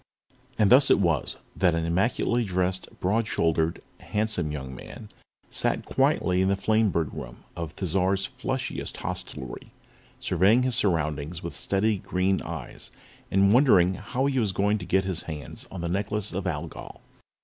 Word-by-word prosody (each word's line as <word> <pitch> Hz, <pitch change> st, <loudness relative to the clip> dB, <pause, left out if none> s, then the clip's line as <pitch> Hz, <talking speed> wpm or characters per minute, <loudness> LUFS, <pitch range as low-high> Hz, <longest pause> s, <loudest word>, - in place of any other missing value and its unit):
And 105 Hz, -1 st, +3 dB
thus 135 Hz, +2 st, +8 dB
it -, -, +6 dB
was 85 Hz, -7 st, 0 dB, 0.2 s
that 90 Hz, -3 st, +3 dB
an 85 Hz, 0 st, -1 dB
immaculately 115 Hz, +7 st, +1 dB
dressed, 95 Hz, -2 st, -1 dB
broad 110 Hz, +4 st, +1 dB
shouldered, 80 Hz, -2 st, 0 dB, 0.2 s
handsome 105 Hz, -7 st, -1 dB
young 65 Hz, -3 st, -6 dB
man 105 Hz, -, -10 dB, 0.4 s
sat -, -, +1 dB
quietly 90 Hz, 0 st, +2 dB
in 95 Hz, -, +2 dB
the 100 Hz, -, +2 dB
Flamebird 100 Hz, -6 st, +1 dB
Room -, -, -8 dB
of 85 Hz, -2 st, -6 dB
Thizar's 95 Hz, +2 st, +1 dB
flushiest 130 Hz, 0 st, -4 dB
hostelry 65 Hz, -2 st, -6 dB, 0.5 s
surveying 100 Hz, +8 st, +3 dB
his 130 Hz, -1 st, +1 dB
surroundings 80 Hz, -, 0 dB
with 85 Hz, -4 st, -5 dB
steady 100 Hz, -, +1 dB
green 95 Hz, +1 st, 0 dB
eyes 80 Hz, -6 st, -7 dB, 0.4 s
and 100 Hz, +1 st, +4 dB
wondering 100 Hz, -9 st, +5 dB
how 125 Hz, +7 st, -2 dB
he 135 Hz, -2 st, +1 dB
was 105 Hz, -5 st, 0 dB
going 105 Hz, +3 st, +1 dB
to 90 Hz, -, -8 dB
get 95 Hz, 0 st, +2 dB
his 95 Hz, -3 st, -3 dB
hands 75 Hz, -3 st, -7 dB
on 95 Hz, -, -7 dB
the 85 Hz, -, -2 dB
Necklace 100 Hz, +3 st, -2 dB
of 95 Hz, +1 st, -3 dB
Algol. 80 Hz, -1 st, -6 dB
95 Hz, 155 wpm, -26 LUFS, 85-105 Hz, 0.5 s, thus